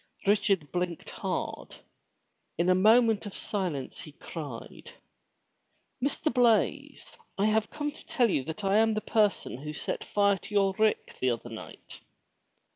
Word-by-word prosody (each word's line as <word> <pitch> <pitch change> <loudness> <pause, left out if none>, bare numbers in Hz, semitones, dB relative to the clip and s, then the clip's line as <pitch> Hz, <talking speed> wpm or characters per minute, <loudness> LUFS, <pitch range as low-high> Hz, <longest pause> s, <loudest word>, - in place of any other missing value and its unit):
Richard 195 -7 +2
bUnked 180 -2 -3
hard. - - -4 0.8
In 170 +2 +2
a - - +6
moment 220 +2 +4
of 200 - -9
silence 175 -10 -3
he 150 - -11
cried. 145 -7 -8 1.1
"Mr. 290 +3 0
Blaize, 240 -4 +1 0.2
I 200 - +2
have 215 0 +2
come 295 -1 -3
to 295 - -15
tell 240 -5 +2
you 135 - +1
that 160 +7 -6
I 195 +1 +3
am 220 0 +3
the 215 - -1
person 210 - +1
who 150 +2 -6
set - - -4
fire 200 -1 +2
to 210 - -8
your 195 -1 +3
rick 220 0 +1
the 130 - +2
other 120 0 -3
night.' 110 - -10
200 Hz, 150 wpm, -29 LUFS, 165-220 Hz, 1.1 s, a